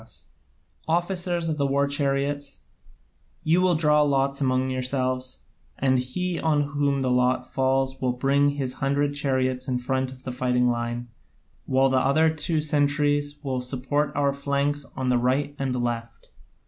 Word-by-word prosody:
Officers 175 0 0
of 155 -2 -2
the 140 - +2
war 140 +1 +1
chariots, 140 0 -1 0.8
you 165 +3 +3
will 185 -2 +3
draw 150 -1 +3
lots 140 -1 +1
among 130 -1 +1
yourselves, 130 0 -2 0.3
and 130 -1 +2
he 175 +8 -2
on 150 -2 +2
whom 140 -1 0
the 130 - +1
lot 125 0 +2
falls 135 0 0
will 130 -1 +1
bring 140 +3 +2
his 140 -3 -2
hundred 140 +1 +1
chariots 130 -2 -1
in 130 -2 0
front 130 +1 -1
of 130 0 -13
the 130 - -4
fighting 125 0 +1
line, 120 0 -3 0.6
while 135 0 +3
the 130 - +3
other 155 +5 +3
two 160 +1 -1
centuries 145 -1 +1
will 130 -2 -2
support 135 +4 -1
our 140 -1 +2
flanks 140 +1 -1
on 130 -1 -1
the 125 -1 +3
right 135 +4 0
and 135 -2 -1
left." 120 -1 -4
140 Hz, 155 wpm, -25 LUFS, 130-145 Hz, 0.8 s, you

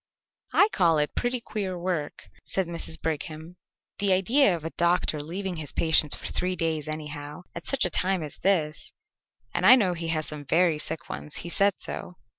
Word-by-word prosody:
"I 405 - +7
call 170 - +3
it 150 0 0
pretty 245 +1 0
queer 200 -5 -4
work," 170 -4 -4
said 190 - -1
Mrs. 165 -1 -2
Brigham. 160 +2 -4 0.4
"The 200 -1 +3
idea 200 +3 +4
of 160 -2 -8
a 165 - -3
doctor 170 -3 +1
leaving 180 +4 -4
his 150 -3 -2
patients 160 -2 +3
for - - -11
three 185 0 -1
days 160 -3 -1
anyhow, 150 +1 -6
at 170 - -7
such 275 -1 +1
a - - -1
time 185 -2 +1
as 150 - -5
this, 160 -6 0 0.6
and - - -1
I 225 +7 +10
know 195 -8 +2
he 170 -1 -4
has 155 -1 0
some 150 -1 -6
very 165 +1 +2
sick 160 +1 -4
ones; 150 - -7
he - - -5
said 200 +3 +2
so. 180 - -6
170 Hz, 190 wpm, -26 LUFS, 155-190 Hz, 0.6 s, I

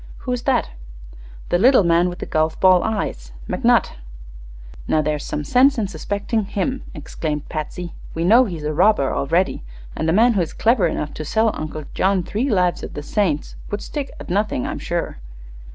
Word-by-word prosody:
"Who 250 - -2
is 250 -1 -1
that?" - - +1 0.8
"The 175 - +2
little 250 +1 +6
man 170 +1 +3
with 175 - -7
the - - -5
golf 155 0 0
ball 185 -1 +6
eyes; - - -3
McNutt." - - +2 1.0
"Now, 155 - +2
there's 150 -1 -1
some 150 - -3
sense 260 - +4
in 215 -3 0
suspecting 205 +1 -2
him," 235 +7 -2
exclaimed 150 0 -4
Patsy. 170 +2 -5 0.2
"We 165 - -1
know 230 +8 +6
he's 170 -8 -6
a 150 +1 -2
robber, 175 -4 +3
already, 170 +7 0 0.3
and 160 - -1
a - - +4
man 230 +7 +4
who 195 - +1
is 165 - -3
clever 230 -2 +3
enough 150 - -3
to 155 - -5
sell 220 +8 +1
Uncle 155 0 -5
John 190 -1 +1
three 230 +10 -2
'Lives 180 -5 +1
of - - -8
the 145 - -5
Saints' 165 -4 -1
would 205 - -4
stick 285 -3 -4
at - - -8
nothing, 205 -8 0
I'm - - -4
sure." - - -3
180 Hz, 185 wpm, -21 LUFS, 155-220 Hz, 1.0 s, little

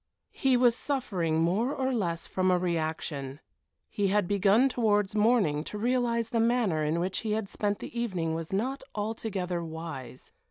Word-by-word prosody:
He 265 -3 +2
was 245 -1 +4
suffering 185 - 0
more 205 +10 +1
or 265 0 0
less 170 -8 -1
from 185 0 0
a 180 - +4
reaction. 155 -5 -2 0.5
He 200 -1 -1
had 200 -1 +2
begun 205 +6 +4
towards 210 -6 +1
morning 210 -9 +3
to 210 - -6
realize 235 0 +1
the 230 - 0
manner 225 -9 +2
in 155 +3 0
which 185 +2 -1
he 215 -2 -2
had 215 -2 -1
spent 205 +1 -1
the 235 - -6
evening 175 -8 -1
was 165 0 -4
not 250 +8 -1
altogether 205 -5 -3
wise. 160 -6 -7
200 Hz, 165 wpm, -29 LUFS, 170-230 Hz, 0.5 s, was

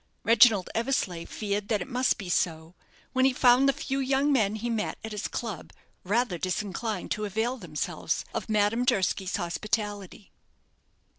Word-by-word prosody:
Reginald 225 -4 +5
Eversleigh 225 -9 -1
feared 205 -1 -3
that 215 -2 +1
it 180 - -5
must 250 +1 +1
be 195 - -7
so, 165 -1 -1 0.4
when 260 - +2
he 265 0 +4
found 250 +2 +5
the - - +6
few 270 0 -3
young 275 +2 +2
men 215 -5 +2
he 220 +2 -4
met 225 -3 -2
at 220 - -6
his 210 -1 -3
club 220 -7 -5 0.3
rather 205 -2 0
disinclined 200 +2 -3
to 215 - -1
avail 220 +5 -1
themselves 165 -9 -3
of - - -4
Madame 215 +3 +2
Durski's 195 -5 +1
hospitality. 205 +3 -3
215 Hz, 155 wpm, -27 LUFS, 190-245 Hz, 0.4 s, the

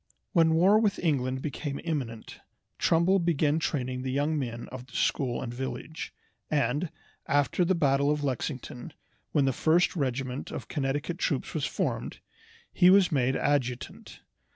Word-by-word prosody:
When 165 -3 +4
war 190 +6 +5
with 210 -3 +1
England 130 -5 0
became 145 -1 -4
imminent 130 -9 -4 0.4
Trumbull 170 +4 +3
began 160 -3 +2
training 130 -5 -2
the 130 - -3
young 145 +4 0
men 120 -5 -4
of 130 0 -8
the 130 - -15
school 130 -2 0
and 120 -2 -5
village, 135 +5 -5 0.4
and, 150 +2 +1 0.4
after 145 +5 +2
the 185 +2 +2
battle 140 -3 +2
of 150 0 0
Lexington, 130 +1 -4 0.4
when 145 -3 +3
the 135 - +2
first 165 +8 +3
regiment 130 -3 -2
of - - -6
Connecticut 145 +5 -2
troops 145 -8 -1
was 155 -4 -1
formed, - - -2 0.6
he 180 - +6
was 190 -1 +6
made 130 -3 +2
adjutant. 130 -4 -2
145 Hz, 150 wpm, -28 LUFS, 130-165 Hz, 0.6 s, he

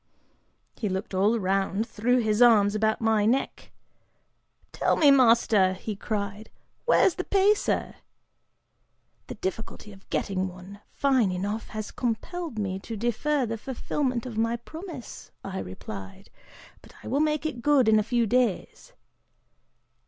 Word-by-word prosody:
He 210 - -2
looked 190 +1 -4
all 200 +5 +3
around, 195 +1 0
threw 245 +3 +1
his 220 -2 +1
arms 210 -4 +6
about 220 +1 0
my 220 -2 +2
neck. 255 +4 -1 1.0
'Tell - - +1
me, 290 -3 +6
master,' 230 -7 +4
he 205 +3 -6
cried, 205 0 -4 0.4
'where's 385 - +4
the 365 - -4
pacer?' 405 +2 +1 1.3
['The - - -7
difficulty 210 +1 -6
of 195 - -18
getting 190 -1 -1
one 185 +2 -11
fine 260 -8 +2
enough 205 +5 -3
has 215 -1 -6
compelled 255 +5 -4
me 190 -2 -2
to 225 +3 -7
defer 245 +5 0
the 225 -1 -4
fulfillment 255 0 -2
of 230 -3 -5
my 230 +1 +1
promise,' 315 - -9
I 190 -1 -5
replied, 95 +1 -9 0.5
'but - - -18
I - - -9
will 275 - 0
make 305 0 0
it 260 -6 -3
good 275 -2 +3
in 215 -1 +5
a - - +3
few 235 +2 +1
days. 245 - -1
225 Hz, 140 wpm, -26 LUFS, 200-255 Hz, 1.3 s, arms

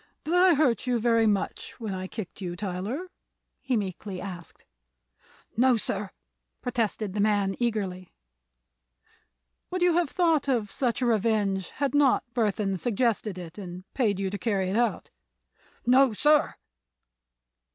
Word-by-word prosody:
"Did 320 - -2
I 360 -1 +6
hurt 265 -4 +2
you 245 -1 +2
very 230 -1 +3
much 205 +3 -2
when 220 -4 -4
I 185 0 -4
kicked 200 -1 -8
you, 175 -2 -4
Tyler?" 210 - -4 0.5
he 260 -3 0
meekly 195 -1 -4
asked. 180 -3 -9 0.9
"No, 250 +1 +4
sir!" 205 -1 -2 0.5
protested 225 -5 -2
the 210 - -3
man, 200 -2 +2
eagerly. 195 -6 -2 1.6
"Would 365 -1 -1
you 355 -1 +4
have 345 -4 +2
thought 325 -5 +2
of 225 -6 0
such 250 -1 -1
a - - +2
revenge 210 -4 +1
had 280 -2 -2
not 290 -3 +4
Burthon 210 -4 0
suggested 225 -3 0
it, 175 +2 -8
and 180 -1 -7
paid 215 -7 +1
you 195 -1 -2
to 205 - -4
carry 190 -2 0
it - - -1
out?" 235 +1 0 0.7
"No, 255 0 +5
sir!" 300 +7 +3
220 Hz, 140 wpm, -27 LUFS, 195-255 Hz, 1.6 s, I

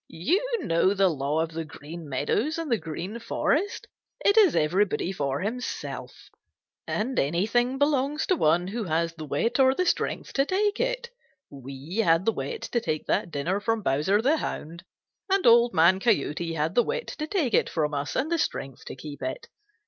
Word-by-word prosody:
"You 310 - 0 0.2
know 185 - +2
the 195 -1 +4
law 150 0 -1
of 165 - -5
the 165 0 -4
Green 155 +1 -10
Meadows 215 - 0
and 325 -5 -4
the 230 - +2
Green 180 +8 -6
Forest. 340 - -1 0.4
It 405 - +5
is 415 -8 +6
everybody 180 +3 +1
for 140 -5 -2
himself, 235 +6 -5 0.6
and 250 +5 -1
anything 220 - +1
belongs 285 +1 +1
to 370 - +2
one 175 - +2
who 225 +1 -3
has 165 0 0
the 155 -2 -8
wit 230 - 0
or 265 0 +5
the 365 - +1
strength - - -1
to 275 - +2
take 410 +2 +1
it. - - -2 0.4
We 140 - -8
had 170 -5 +3
the 225 - +4
wit 460 -2 -5
to 235 - +1
take 155 -9 -2
that - - 0
dinner 170 +6 -1
from 225 +1 -1
Bowser 155 +10 +2
the 295 +5 +3
Hound, 170 - -5 0.5
and 390 0 +2
Old 235 0 +6
Man 170 +2 +4
Coyote 165 - 0
had 155 +2 -1
the 240 - +5
wit 475 - -3
to 305 - -2
take 310 - 0
it - - +3
from 150 -2 -1
us 145 +1 -3
and 295 +5 -1
the 335 - +1
strength 135 - -3
to - - -7
keep 145 +2 -9
it. 465 +8 -5
200 Hz, 185 wpm, -26 LUFS, -, 0.6 s, is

